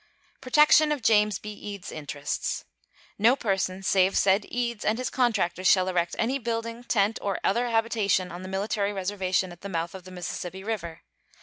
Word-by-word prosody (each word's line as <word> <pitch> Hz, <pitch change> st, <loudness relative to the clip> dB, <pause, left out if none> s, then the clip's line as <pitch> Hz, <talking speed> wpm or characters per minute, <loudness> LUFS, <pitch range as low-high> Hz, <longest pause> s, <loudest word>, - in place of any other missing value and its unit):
Protection 300 Hz, +3 st, +5 dB
of 290 Hz, -5 st, -2 dB
James 210 Hz, -2 st, +4 dB
B. 210 Hz, 0 st, -8 dB
Eads's 200 Hz, -2 st, -8 dB
interests. 145 Hz, -1 st, -4 dB, 0.5 s
No 230 Hz, +5 st, +5 dB
person 195 Hz, -5 st, -1 dB
save 190 Hz, 0 st, +3 dB
said 195 Hz, +1 st, +3 dB
Eads 235 Hz, -2 st, -2 dB
and 215 Hz, +1 st, +1 dB
his 255 Hz, -, -3 dB
contractors 190 Hz, -8 st, +1 dB
shall 185 Hz, -1 st, +4 dB
erect 175 Hz, -2 st, 0 dB
any 255 Hz, +5 st, 0 dB
building, 230 Hz, 0 st, -4 dB
tent, 215 Hz, -2 st, +1 dB
or 200 Hz, -1 st, -2 dB
other 240 Hz, +5 st, +1 dB
habitation 220 Hz, -5 st, +1 dB
on 175 Hz, +1 st, -7 dB
the 185 Hz, -, -7 dB
military 200 Hz, +1 st, -1 dB
reservation 190 Hz, -1 st, -1 dB
at 175 Hz, -, -13 dB
the 200 Hz, -, -6 dB
mouth 170 Hz, -2 st, -3 dB
of 190 Hz, -1 st, -9 dB
the 185 Hz, -, -12 dB
Mississippi 180 Hz, +1 st, -6 dB
River. 190 Hz, -7 st, -4 dB
200 Hz, 175 wpm, -26 LUFS, 185-230 Hz, 0.5 s, Protection